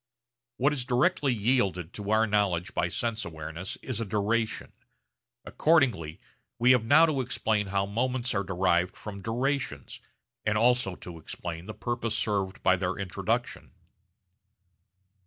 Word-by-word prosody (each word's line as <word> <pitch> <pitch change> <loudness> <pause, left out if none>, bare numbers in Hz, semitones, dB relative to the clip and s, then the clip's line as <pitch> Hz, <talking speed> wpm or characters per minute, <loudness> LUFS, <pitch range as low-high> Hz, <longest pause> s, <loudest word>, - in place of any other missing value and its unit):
What 140 +3 +3
is 135 -4 -2
directly 135 +3 +2
yielded 100 -7 0
to 105 -1 -6
our 110 +1 +4
knowledge 100 -4 0
by 85 - +1
sense 115 +5 -2
awareness 80 +2 -6
is 120 -4 -2
a - - -1
duration. 110 +3 -1 0.7
Accordingly 115 - +2 0.4
we 125 +2 +5
have 125 -3 +4
now 145 +8 +6
to 150 -5 0
explain 110 -4 0
how 100 0 0
moments 125 +4 -1
are 100 - +1
derived 90 -1 +1
from 100 -2 -8
durations, 120 - -2 0.4
and 105 0 +1
also 120 -4 +3
to 85 -2 -9
explain 85 +2 -7
the 110 - -7
purpose 120 -2 -2
served 100 -4 -1
by 95 0 +4
their 90 0 -1
introduction. 95 -3 -3
105 Hz, 140 wpm, -28 LUFS, 95-125 Hz, 0.7 s, now